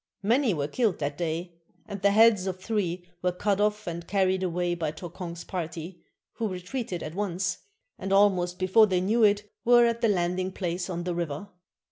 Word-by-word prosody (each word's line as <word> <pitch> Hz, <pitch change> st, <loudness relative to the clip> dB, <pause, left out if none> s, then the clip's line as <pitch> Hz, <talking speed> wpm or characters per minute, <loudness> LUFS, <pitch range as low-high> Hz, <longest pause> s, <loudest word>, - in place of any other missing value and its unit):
Many 230 Hz, 0 st, +3 dB
were 145 Hz, -2 st, -1 dB
killed 215 Hz, +3 st, 0 dB
that 145 Hz, -1 st, -3 dB
day, 170 Hz, +2 st, -3 dB, 0.3 s
and 200 Hz, -2 st, -6 dB
the 200 Hz, -, +5 dB
heads 210 Hz, -2 st, +5 dB
of 185 Hz, -1 st, -3 dB
three 185 Hz, -4 st, -2 dB
were 180 Hz, -, +1 dB
cut 200 Hz, +2 st, 0 dB
off 210 Hz, 0 st, +1 dB
and 170 Hz, 0 st, -5 dB
carried 190 Hz, -1 st, +1 dB
away 175 Hz, -1 st, 0 dB
by 165 Hz, -3 st, -2 dB
Tokong's 170 Hz, +1 st, -7 dB
party, 170 Hz, -1 st, -6 dB, 0.4 s
who 225 Hz, -, -1 dB
retreated 185 Hz, 0 st, -4 dB
at 155 Hz, -, -6 dB
once, 195 Hz, -1 st, -2 dB, 0.4 s
and, 195 Hz, -, -4 dB
almost 185 Hz, -3 st, +3 dB
before 190 Hz, +4 st, +5 dB
they 185 Hz, -2 st, +1 dB
knew 220 Hz, +5 st, +2 dB
it, 205 Hz, 0 st, +3 dB, 0.2 s
were 240 Hz, 0 st, +6 dB
at 235 Hz, 0 st, 0 dB
the 230 Hz, -, +3 dB
landing 185 Hz, 0 st, 0 dB
place 175 Hz, -1 st, -3 dB
on 175 Hz, -1 st, -3 dB
the 180 Hz, 0 st, -2 dB
river. 170 Hz, +2 st, -4 dB
185 Hz, 185 wpm, -27 LUFS, 175-205 Hz, 0.4 s, were